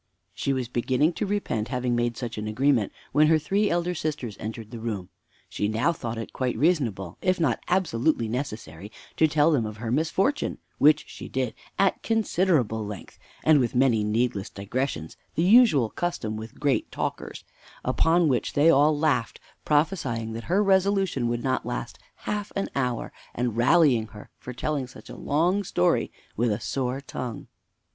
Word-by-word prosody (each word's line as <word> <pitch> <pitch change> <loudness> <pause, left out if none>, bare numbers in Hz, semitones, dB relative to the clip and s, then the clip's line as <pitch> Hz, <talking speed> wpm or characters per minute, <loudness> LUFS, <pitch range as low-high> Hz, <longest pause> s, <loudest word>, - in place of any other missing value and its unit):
She 140 - -1
was 130 -3 -1
beginning 130 +7 +1
to 210 - -2
repent 190 - -1
having 125 -1 -1
made 120 -1 0
such 120 -3 -5
an 105 - -4
agreement, 125 0 +2 0.2
when 150 +2 +5
her 160 0 +5
three 200 +7 +1
elder 175 +1 0
sisters 150 - -3
entered 110 0 -6
the 120 - -7
room. 105 -5 -4 0.4
She 105 - -2
now 115 +10 +1
thought 115 -6 -5
it 115 - -6
quite 125 -2 -1
reasonable, 120 - 0
if 185 -1 +1
not 160 - +1
absolutely 160 -8 +1
necessary, 110 - -5 0.3
to 160 - +5
tell 155 +1 +3
them 140 -7 +2
of 110 -1 -5
her 115 +1 -4
misfortune; 175 - 0 0.2
which 150 +1 +5
she - - -9
did 130 -3 -1 0.2
at 195 - +2
considerable 175 - +1
length, 105 -2 -8 0.2
and 155 -2 +5
with 120 -2 0
many 125 -4 +3
needless 105 -1 0
digressions 100 - -4 0.2
(the 165 - +1
usual 185 - +5
custom 140 -11 -3
with 110 +1 -8
great 145 -2 0
talkers); - - -4 0.4
upon 165 +1 +3
which 130 -4 0
they 155 +3 +5
all 150 +1 +4
laughed, 145 -6 0 0.3
prophesying 145 -8 0
that 115 +1 -6
her 195 +4 +2
resolution 195 -8 +2
would 120 0 -2
not 130 -1 0
last 120 0 -5 0.3
half 210 -1 -3
an 195 - -1
hour, 125 -4 -2 0.2
and 120 -2 -1
rallying 125 -2 +4
her 105 -1 -13
for 125 - -7
telling 140 +1 -2
such 125 - -13
a - - -8
long 175 +7 +1
story 90 - +1 0.2
with 120 +1 +1
a 105 - -1
sore 125 +4 -2
tongue. 125 -4 -6
130 Hz, 170 wpm, -26 LUFS, 115-160 Hz, 0.4 s, when